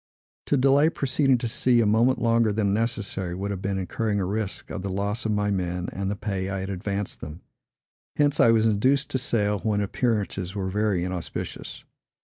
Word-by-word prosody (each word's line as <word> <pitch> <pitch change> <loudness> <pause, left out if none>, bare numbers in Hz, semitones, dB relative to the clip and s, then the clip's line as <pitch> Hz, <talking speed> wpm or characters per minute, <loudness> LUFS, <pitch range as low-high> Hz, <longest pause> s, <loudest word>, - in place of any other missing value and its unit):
To 145 - +2
delay 140 +4 +4
proceeding 135 -3 +2
to 120 0 -3
sea 120 +2 +2
a 115 - +3
moment 115 +5 +3
longer 115 -2 +3
than 105 -1 0
was - - +1
necessary, 105 -5 -1
would 100 +2 -3
have 95 -2 -4
been 95 0 -1
incurring 105 +3 -1
a 95 - 0
risk 105 +1 -3
of 95 - -4
the 100 - -4
loss 100 +4 -2
of - - 0
my 105 0 +1
men, 90 -2 -2
and 95 0 -2
the 100 - -1
pay 100 -3 -3
I 100 -1 -3
had 95 +1 -4
advanced 100 +1 -4
them. 75 +4 -8 0.7
Hence, 145 -1 +2
I 115 - +6
was 115 -1 +4
induced 130 +7 +2
to 130 - 0
sail 105 -6 +1
when 105 0 0
appearances 100 -3 -1
were 95 -2 -2
very 105 -3 +1
inauspicious. 90 -2 -5
105 Hz, 200 wpm, -25 LUFS, 95-115 Hz, 0.7 s, I